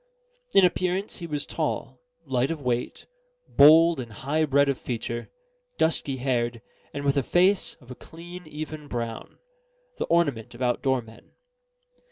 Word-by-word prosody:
In 195 - +8
appearance, 185 +3 -1
he 170 - -6
was 150 -2 -2
tall, - - -3 0.2
light 130 +1 0
of 165 -1 -3
weight, 125 -3 -2 0.4
bold 160 +2 +6
and 120 -3 -6
high 145 +8 -1
bred 140 0 +3
of 140 -2 0
feature, 120 -1 -4 0.5
dusky 145 -4 +1
haired, 120 -2 -1 0.3
and 145 0 -5
with 140 0 +2
a - - +4
face 185 +8 +2
of 130 -5 -16
a - - -7
clean 175 +3 -11
even 155 0 -7
brown: 115 -3 -5 0.6
the - - 0
ornament 145 -10 0
of 120 - -12
outdoor 125 +1 +1
men. 115 0 -17
140 Hz, 150 wpm, -26 LUFS, 125-165 Hz, 0.6 s, In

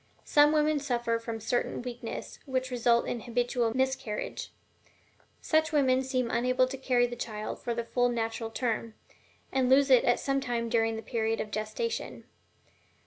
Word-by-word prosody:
Some 295 0 +5
women 305 -1 +2
suffer 240 -4 -1
from 230 -1 -5
certain 240 +2 -1
weakness 240 -2 -6
which 260 -1 -1
result 235 -1 +3
in 240 - -3
habitual 240 0 -1
miscarriage; 260 -5 -2 0.9
such 315 0 +2
women 265 -4 +3
seem 255 -2 -1
unable 255 +2 +2
to 270 - -4
carry 250 -2 +2
the 240 0 -5
child 215 -3 -5
for 235 - -2
the 235 - -2
full 245 +1 +1
natural 225 -1 -2
term, 230 -1 -2 0.6
and 260 -1 +1
lose 270 +1 +5
it 255 - +7
at 245 - +3
some 275 0 0
time 235 -2 -2
during 225 -1 +1
the 220 - -6
period 225 -1 -1
of 210 - -4
gestation. 215 - -3
245 Hz, 160 wpm, -29 LUFS, 230-260 Hz, 0.9 s, it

